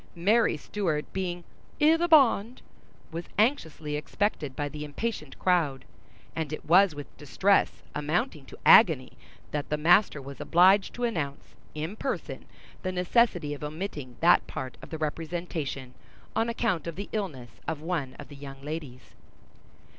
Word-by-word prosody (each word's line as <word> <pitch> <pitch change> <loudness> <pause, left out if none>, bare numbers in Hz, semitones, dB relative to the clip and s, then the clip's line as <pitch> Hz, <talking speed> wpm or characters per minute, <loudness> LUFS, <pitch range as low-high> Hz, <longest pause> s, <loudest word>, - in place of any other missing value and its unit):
Mary 205 +1 +3
Stuart 160 -2 -2
being 180 -2 -3 0.4
"i' 310 +2 +6
the 345 +1 +1
bond," 255 -7 +4 0.5
was 165 +1 -5
anxiously 160 - 0
expected 150 -3 -2
by 145 - -2
the 150 +1 -6
impatient 205 +10 -4
crowd, 160 -8 +1 0.5
and 160 -2 -3
it 155 - -6
was 180 +1 +5
with 145 -1 -9
distress 155 +9 +2
amounting 155 - -1
to - - -12
agony 160 - +6 0.4
that 150 -1 -3
the 150 - 0
master 175 +1 +4
was 140 0 -9
obliged 190 +3 +4
to 245 - -5
announce, 155 -12 -3 0.2
in 160 +6 -4
person, 265 +4 -4 0.4
the 185 - -2
necessity 180 -4 +2
of 145 - -8
omitting 150 -5 -5
that 175 +2 +5
part 130 -1 -6
of - - -11
the 160 - -5
representation, 155 -4 -4 0.4
on 225 +1 +1
account 220 -9 -1
of 170 - -4
the 200 +3 -5
illness 150 - -4 0.2
of 155 - -2
one 155 -5 -3
of - - -10
the 145 - -11
young 135 -1 -9
ladies. 145 -5 -7
165 Hz, 150 wpm, -28 LUFS, 145-200 Hz, 0.5 s, i